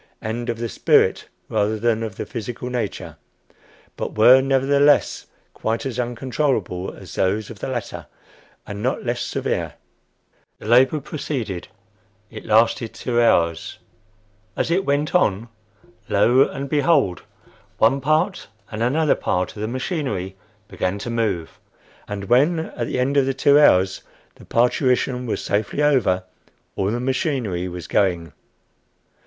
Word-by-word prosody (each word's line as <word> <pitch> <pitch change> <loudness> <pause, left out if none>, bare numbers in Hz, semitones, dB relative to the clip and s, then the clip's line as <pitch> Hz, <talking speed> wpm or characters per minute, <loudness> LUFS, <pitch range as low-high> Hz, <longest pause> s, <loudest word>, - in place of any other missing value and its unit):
and 120 +2 -4
"of 115 - -2
the 115 0 -3
spirit - - +2 0.2
rather 110 0 0
than 115 0 0
of 110 -4 -5
the - - -5
physical 120 +1 -6
nature; 120 -5 -4 0.8
but - - -5
were, 125 +4 +7
nevertheless, 140 +2 +2 0.3
quite 115 +5 -2
as 125 -2 -4
uncontrollable 120 -6 -2
as - - -12
those 105 +4 -1
of 105 - -11
the - - -4
latter, 125 -5 -5 0.6
and 105 0 -7
not 130 +3 -2
less 120 0 -1
severe." - - -2 0.8
The - - -13
labor 130 +6 +4
proceeded. 130 - -4 0.6
It 110 - -9
lasted 115 +2 +2
two 120 -1 0
hours. 85 -7 +1 0.8
As - - 0
it 190 +3 +1
went 145 +2 0
on, 115 - +1 0.6
lo 120 +6 +4
and 140 0 -6
behold! 140 - +2 0.6
one 130 +5 +3
part 155 +8 0 0.2
and 105 - -5
another 145 +6 +2
part 90 0 -2
of 105 - -7
the 110 - -1
machinery 125 - -3 0.3
began 95 0 -2
to 115 +4 -5
move! 105 -8 -2 0.5
And 100 -1 -5
when, 140 - +3
at 120 -7 -4
the - - -3
end 135 +3 +1
of 135 -1 +3
the 135 - -1
two 140 +2 +5
hours, 95 -9 +4 0.3
the - - -17
parturition 125 +1 +1
was - - -2
safely 105 +8 -1
over, 120 -11 +2 0.5
all 95 0 0
the 120 +3 -1
machinery 125 - -1
was 90 -1 -7
going! 85 -6 0
120 Hz, 140 wpm, -22 LUFS, 105-135 Hz, 0.8 s, were